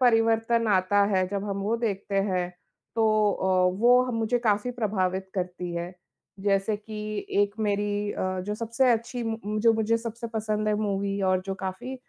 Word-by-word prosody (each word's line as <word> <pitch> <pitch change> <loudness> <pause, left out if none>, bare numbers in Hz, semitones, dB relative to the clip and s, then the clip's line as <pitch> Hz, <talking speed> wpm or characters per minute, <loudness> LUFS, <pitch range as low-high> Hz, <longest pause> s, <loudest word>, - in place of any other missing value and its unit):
परिवर्तन 225 -1 +3
आता 195 +1 +3
है 185 -1 +2
जब 200 0 -3
हम 200 - -2
वो 220 +3 0
देखते 205 -3 -3
हैं, 185 -3 0 0.4
तो 215 -2 +3
अ, 190 - -2 0.3
वो 245 +2 +6
ह - - -4
मुझे 225 +2 +1
काफ़ी 220 0 +1
प्रभावित 190 -5 -1
करती 180 -1 -3
है। 170 +1 -4 0.5
जैसे 200 +1 +1
कि, 215 0 -6
एक 205 0 +2
मेरी 205 0 0
अ, 185 0 -2
जो 210 - -1
सबसे 230 +3 +1
अच्छी 235 +2 -2
मु 220 -2 -3
जो 230 +1 +5
मुझे 225 +1 +1
सबसे 235 +1 -6
पसंद 215 -1 -1
है 210 - +2
मूवी 200 -1 -1
और 185 -1 +2
जो 195 - -2
काफ़ी 190 +8 -4
210 Hz, 175 wpm, -26 LUFS, 195-225 Hz, 0.5 s, वो